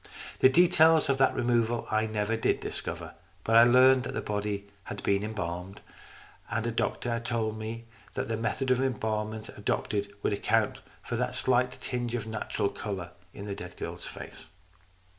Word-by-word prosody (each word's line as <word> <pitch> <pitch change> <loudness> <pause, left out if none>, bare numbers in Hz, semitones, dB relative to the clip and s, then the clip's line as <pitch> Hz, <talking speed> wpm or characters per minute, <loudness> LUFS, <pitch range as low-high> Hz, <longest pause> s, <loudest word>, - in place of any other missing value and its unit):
The 130 - +7
details 160 -1 +5
of 135 -1 +2
that 135 - +4
removal 120 -1 +1
I 110 +1 +2
never 110 +1 -1
did 115 - +1
discover. - - -5 0.3
But 115 - +2
I 115 - +9
learned 130 +2 +6
that 125 - -5
the - - -1
body 105 -1 -2 0.2
had - - -6
been 100 0 +2
embalmed, 95 -3 -4 0.7
and 115 0 -1
a 120 - 0
doctor 115 +1 -1
told 115 -2 -2
me 115 +1 -5 0.3
that - - -2
the 115 - -1
method 115 +4 -1
of 130 0 +3
embalm 110 -4 -1
ment 110 0 -7
adopted 100 -1 -2
would - - +1
account 110 +1 +1 0.2
for - - -3
that - - -1
slight 125 0 +2
tinge 120 -1 -2
of 115 - -3
natural 110 -2 -1
colour 95 -5 -5 0.2
in 100 - -8
the 100 - -3
dead 90 -2 -8
girl's 85 +1 -6
face. - - -9
110 Hz, 175 wpm, -29 LUFS, 105-120 Hz, 0.7 s, I